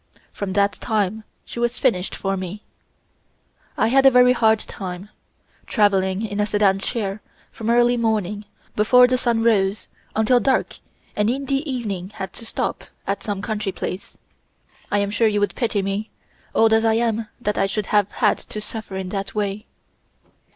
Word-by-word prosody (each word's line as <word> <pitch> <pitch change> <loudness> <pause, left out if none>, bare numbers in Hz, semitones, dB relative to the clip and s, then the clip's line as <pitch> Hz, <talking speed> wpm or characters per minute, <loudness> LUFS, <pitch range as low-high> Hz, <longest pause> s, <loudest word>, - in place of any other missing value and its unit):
From 195 -2 -4
that 200 0 +3
time 215 -1 -1 0.2
she - - -7
was 240 +1 0
finished 195 -8 0
for 195 0 -2
me. 190 +2 -6 1.1
I 220 - +3
had 270 +2 +4
a 270 - +9
very 250 -1 +6
hard 220 -2 +4
time, 190 -1 -7 0.6
traveling 195 -1 +2
in 205 -1 -4
a 210 - +2
sedan 205 -2 +2
chair, 205 -2 -3 0.3
from 225 0 -5
early 240 +1 +4
morning, 210 -3 -1 0.3
before 250 +4 +6
the 250 0 +1
sun 235 -3 +1
rose, 205 -3 +2 0.3
until 225 +3 +4
dark 265 +1 0 0.4
and 210 +1 +2
in 275 +3 -1
the 275 0 0
evening 200 -8 -3
had 190 -3 -6
to 230 - -8
stop - - -3 0.2
at - - -2
some 205 -2 -4
country 210 -2 -2
place. 185 +1 -6 0.7
I 205 - +2
am 200 0 0
sure 225 +2 +3
you 210 -1 +1
would 205 - 0
pity 220 -5 -1
me, 195 +2 -2 0.5
old 225 0 +5
as 225 0 +4
I 225 -1 +3
am, 225 -1 0
that 210 -3 -1
I 195 - +3
should 205 +1 -2
have 205 -1 +4
had 210 -2 +1
to 215 - -7
suffer 210 -2 -6
in 190 -1 -4
that 195 +1 -4
way. 205 +1 -2
210 Hz, 175 wpm, -22 LUFS, 200-230 Hz, 1.1 s, a